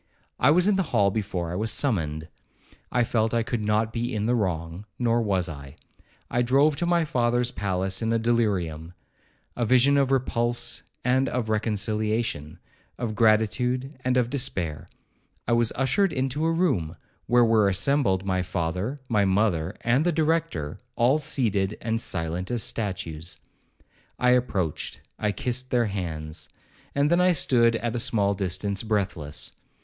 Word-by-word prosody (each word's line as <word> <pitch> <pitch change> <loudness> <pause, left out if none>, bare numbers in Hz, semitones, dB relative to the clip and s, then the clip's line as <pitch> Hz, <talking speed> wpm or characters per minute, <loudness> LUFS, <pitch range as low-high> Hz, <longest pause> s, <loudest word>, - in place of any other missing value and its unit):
I 125 - +5
was 180 +5 +4
in 205 -2 +3
the - - +2 0.2
hall 100 -1 +4
before 95 -5 -3
I - - -3
was 110 +4 0
summoned. 80 - -1 0.6
I 125 - +2
felt 115 0 0
I 115 - +2
could 115 -1 -3
not 105 +1 +1
be 120 +1 -2
in 105 0 -1
the 120 - +2
wrong, 90 -3 -2
nor 120 -1 +2
was 95 -5 0
I. 70 -3 -9 0.5
I 120 - 0
drove 140 +5 +3
to 175 - -1
my 170 -1 +2
father's 120 -4 +1
palace 95 -1 -2
in 115 0 0
a 115 - +3
delirium,—a 95 -8 -1 0.7
vision 130 +4 +4
of 135 -2 +2
repulse 120 -3 0 0.2
and 130 +2 +2
of 120 -3 -2
reconciliation, 110 -5 -1 0.4
of 115 -3 -3
gratitude 120 +5 +2
and 130 0 +1
of 125 -1 +1
despair. 90 - -2 0.6
I - - 0
was 120 -1 +2
ushered 170 +9 +2
into 135 +4 -1
a 165 - +2
room, 135 - 0 0.3
where 120 0 +5
were 110 -3 +4
assembled 100 -1 +1
my 95 -1 0
father, 90 - -3
my 105 -4 +2
mother, 95 -3 +1
and 125 +5 +2
the 175 - +2
Director, 155 - -1 0.2
all 125 +6 +3
seated, 105 -8 0
and 115 0 -1
silent 85 0 -2
as 120 -2 -1
statues. 90 -6 -4 0.8
I 125 0 +3
approached, 100 -11 -1 0.2
I 105 - +1
kissed 125 +5 -2
their 120 -2 +2
hands, 85 -6 -5 0.5
and 140 +2 +2
then 180 +1 +4
stood 115 -5 +3
at 115 +1 -2
a - - 0
small 100 -3 +2
distance 95 +1 -2
breathless. 95 -9 -2
110 Hz, 155 wpm, -25 LUFS, 95-125 Hz, 0.8 s, I